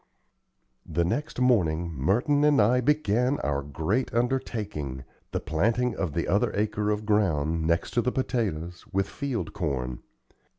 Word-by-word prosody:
The 85 Hz, -, 0 dB
next 145 Hz, -, -2 dB
morning 85 Hz, -10 st, +2 dB
Merton 120 Hz, -, +2 dB
and 150 Hz, -1 st, +5 dB
I 120 Hz, +4 st, +4 dB
began 125 Hz, -1 st, +2 dB
our 70 Hz, -1 st, 0 dB
great 80 Hz, -, -1 dB
undertaking 105 Hz, -, -2 dB, 0.3 s
the -, -, -2 dB
planting 115 Hz, +9 st, 0 dB
of 90 Hz, -7 st, -2 dB
the 85 Hz, -, 0 dB
other 100 Hz, +3 st, +2 dB
acre 105 Hz, 0 st, 0 dB
of 105 Hz, 0 st, -1 dB
ground, 80 Hz, -7 st, +1 dB
next 85 Hz, 0 st, +1 dB
to 120 Hz, -, +2 dB
the 125 Hz, +2 st, 0 dB
potatoes, 90 Hz, -10 st, -2 dB
with 95 Hz, 0 st, +1 dB
field 140 Hz, -1 st, -4 dB
corn. 65 Hz, -, -2 dB
105 Hz, 140 wpm, -27 LUFS, 80-125 Hz, 0.3 s, and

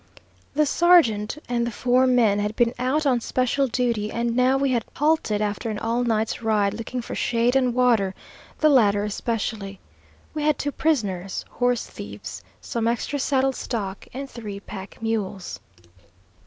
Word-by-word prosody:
The 305 Hz, +1 st, +4 dB
sergeant 290 Hz, -10 st, +4 dB
and 235 Hz, -1 st, 0 dB
the -, -, -3 dB
four 250 Hz, +3 st, +2 dB
men 230 Hz, -5 st, +3 dB
had 210 Hz, +1 st, -2 dB
been 235 Hz, -1 st, +2 dB
out 270 Hz, +5 st, +1 dB
on 250 Hz, -4 st, +2 dB
special 255 Hz, +3 st, +1 dB
duty, 235 Hz, -4 st, 0 dB
and 235 Hz, 0 st, -1 dB
now 255 Hz, +2 st, +4 dB
we 275 Hz, -1 st, +1 dB
had 235 Hz, -3 st, +1 dB
halted 295 Hz, -9 st, +1 dB
after 205 Hz, +2 st, -2 dB
an 215 Hz, -, -3 dB
all 230 Hz, +3 st, 0 dB
night's 225 Hz, -2 st, 0 dB
ride 210 Hz, -3 st, +2 dB
looking 230 Hz, +3 st, -5 dB
for -, -, -6 dB
shade 240 Hz, +2 st, +1 dB
and 255 Hz, -2 st, +3 dB
water, 230 Hz, -7 st, +3 dB, 0.5 s
the 310 Hz, -, +6 dB
latter 205 Hz, -7 st, +4 dB
especially. 210 Hz, -2 st, -3 dB, 0.5 s
We 305 Hz, -, -3 dB
had 300 Hz, -1 st, +2 dB
two 290 Hz, -, -2 dB
prisoners, 200 Hz, -, -1 dB
(horse 245 Hz, -1 st, 0 dB
thieves), 100 Hz, -2 st, -8 dB, 0.2 s
some 230 Hz, -, -2 dB
extra 240 Hz, +5 st, -1 dB
saddle 270 Hz, -1 st, +1 dB
stock, 200 Hz, -6 st, -4 dB
and 275 Hz, +2 st, -6 dB
three 215 Hz, -6 st, -7 dB
pack 195 Hz, -1 st, -9 dB
mules. 210 Hz, -4 st, -3 dB
235 Hz, 160 wpm, -24 LUFS, 210-255 Hz, 0.5 s, the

